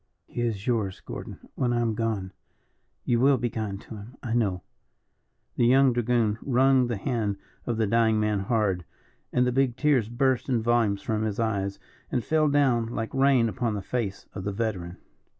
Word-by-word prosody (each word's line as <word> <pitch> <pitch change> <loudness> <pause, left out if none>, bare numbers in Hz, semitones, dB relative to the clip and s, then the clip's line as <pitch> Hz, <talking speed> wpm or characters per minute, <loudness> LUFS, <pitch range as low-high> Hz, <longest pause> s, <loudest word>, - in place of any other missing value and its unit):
He 120 - -5
is 110 -4 -2
yours, 110 -7 -1
Gordon, - - -8
when 125 -2 0
I 120 - +1
am 115 -2 +1
gone. 105 -4 -2 0.7
You 120 -1 +2
will 135 +2 +5
be 120 0 -2
kind 105 -3 -4
to 110 - -10
him, 110 +6 -11
I 115 -3 -2
know." 100 -7 0 0.9
The 120 - +4
young 130 +1 +5
dragoon 120 -2 +1
wrung 130 -1 +3
the 120 -3 -2
hand 105 -2 -1 0.3
of 120 -2 -1
the 110 - +2
dying 110 0 +3
man 105 -1 +1
hard, 100 -3 0 0.5
and 125 - +2
the 125 - +1
big 130 -1 +1
tears 135 -8 +2
burst 130 +1 +1
in 120 -4 +1
volumes 115 -4 +2
from 110 -1 -1
his 110 -1 -2
eyes, 100 -4 -1 0.3
and 125 - 0
fell 155 -1 +2
down 130 -5 +2
like 115 -1 -4
rain 135 -3 +4
upon 115 -1 -1
the 100 - -4
face 100 -4 -3
of 95 - -6
the 100 - -2
veteran. 95 -5 -3
115 Hz, 185 wpm, -26 LUFS, 105-125 Hz, 0.9 s, will